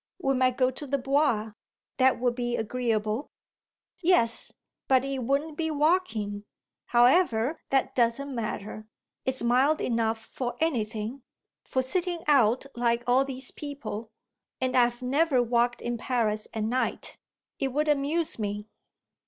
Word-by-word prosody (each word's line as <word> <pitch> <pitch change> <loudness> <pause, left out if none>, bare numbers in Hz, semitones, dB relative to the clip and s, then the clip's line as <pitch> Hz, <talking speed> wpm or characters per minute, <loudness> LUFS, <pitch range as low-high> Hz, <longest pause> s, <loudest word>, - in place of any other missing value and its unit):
We 270 -6 +1
might 255 -1 +2
go 255 -1 +3
to 285 +3 -8
the 280 +1 0
Bois. 270 -5 +1 0.5
That 260 -1 +4
would 245 -1 +1
be 240 -1 -2
agreeable." 225 +1 -1 0.7
"Yes, 330 -11 +3 0.4
but 260 0 +4
it 275 -1 -2
wouldn't 280 +5 -1
be 320 -1 -1
walking. 290 - 0 0.4
However, 245 +1 +3
that 270 -1 +1
doesn't 255 +3 +1
matter. 215 -2 -5 0.4
It's 260 -2 0
mild 260 +6 +3
enough 230 -2 0
for 245 +2 -5
anything 230 -5 -2 0.4
for 260 - 0
sitting 345 +4 -1
out 260 -4 +4
like 240 0 +1
all 255 +2 +4
these 265 -1 -3
people. 280 -7 -6 0.5
And 255 -1 -1
I've 240 0 +3
never 270 0 +2
walked 240 +1 +1
in 240 -1 -2
Paris 215 -4 -1
at 220 - -3
night. 250 +4 -2 0.4
It 270 - +1
would 300 +4 0
amuse 295 +1 0
me." 205 0 -4
255 Hz, 135 wpm, -27 LUFS, 230-280 Hz, 0.7 s, That